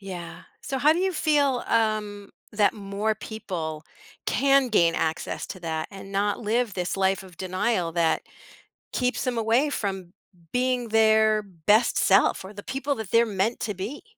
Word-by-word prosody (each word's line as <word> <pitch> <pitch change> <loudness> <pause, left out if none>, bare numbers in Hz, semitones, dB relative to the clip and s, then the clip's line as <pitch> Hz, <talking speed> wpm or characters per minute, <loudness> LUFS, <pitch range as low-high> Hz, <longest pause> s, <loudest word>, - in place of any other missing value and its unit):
Yeah. 185 -3 -8 0.2
So, 270 -1 -3
how 300 +4 +5
do 340 - -1
you 380 0 +1
feel 290 -5 +2
um 215 -3 0 0.2
that 210 0 +2
more 205 +1 -2
people 170 -8 -6 0.4
can 275 -1 +3
gain 170 -7 +3
access 160 0 -2
to 185 - -8
that 160 -2 -3
and 195 0 -10
not 205 +1 0
live 225 0 0
this 180 +1 -2
life 195 0 +1
of 180 -3 -15
denial 185 -1 -1
that 165 -1 +1 0.7
keeps 250 +1 0
them 250 -2 -1
away 230 +7 +2
from 190 -8 -4 0.4
being 250 -1 0
their 220 -1 +4
best 205 +4 +2
self 195 -1 +3
or 195 - -9
the 205 - -8
people 275 +4 -2
that 220 -4 -6
they're 230 +1 +4
meant 210 +2 -1
to 210 - -2
be? 205 +11 -6
210 Hz, 165 wpm, -25 LUFS, 190-240 Hz, 0.7 s, how